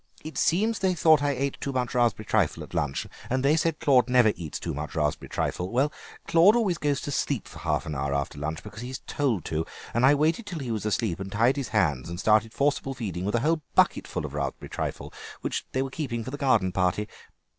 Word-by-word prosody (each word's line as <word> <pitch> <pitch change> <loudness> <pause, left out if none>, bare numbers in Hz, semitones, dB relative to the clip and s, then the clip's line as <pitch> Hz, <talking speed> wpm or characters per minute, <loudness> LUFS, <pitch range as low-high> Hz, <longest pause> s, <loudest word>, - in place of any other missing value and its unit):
It 155 +1 -7
seems 215 +6 +2
they 185 -1 +1
thought 155 -3 +5
I 145 - +1
ate 140 0 -2
too 140 - -2
much 125 -2 -1
raspberry 120 -3 +1
trifle 100 -8 +1
at - - -13
lunch, 70 -2 -1 0.2
and 130 +1 0
they 150 +3 +5
said 160 0 0
Claude 130 -3 +4
never 125 -4 +5
eats 80 -4 -6
too - - -4
much 75 +3 -5
raspberry 75 -2 -1
trifle. 90 +1 -2
Well, 135 +6 +1 0.3
Claude 170 +6 +6
always 195 -8 +1
goes 145 -2 0
to 145 - -4
sleep 140 -4 -1
for - - -11
half - - -1
an 75 - -4
hour 70 0 -2
after 70 +1 -3
lunch, 80 +2 -4
because 105 +1 -9
he's 130 +2 -6
told 120 - -1
to, 80 0 -1 0.3
and 120 - +1
I 140 +3 +7
waited 160 +9 +1
till 180 -4 -5
he 130 -6 -4
was 110 -1 -2
asleep, 105 -3 0
and 95 0 -6
tied 115 +6 +3
his 140 -4 -3
hands 85 - +1
and 85 +1 -5
started 110 +2 +3
forcible 135 +1 0
feeding 95 -7 -4
with 105 - 0
a 120 - +2
whole 160 +2 +1
bucketful 75 - +2
of 70 - -7
raspberry 70 -2 -4
trifle - - -4 0.3
that - - -1
they 130 - 0
were 135 - -5
keeping 125 -6 -3
for 130 - -6
the - - -4
garden 115 -10 +2
party. 95 +3 0
120 Hz, 230 wpm, -27 LUFS, 95-145 Hz, 0.3 s, I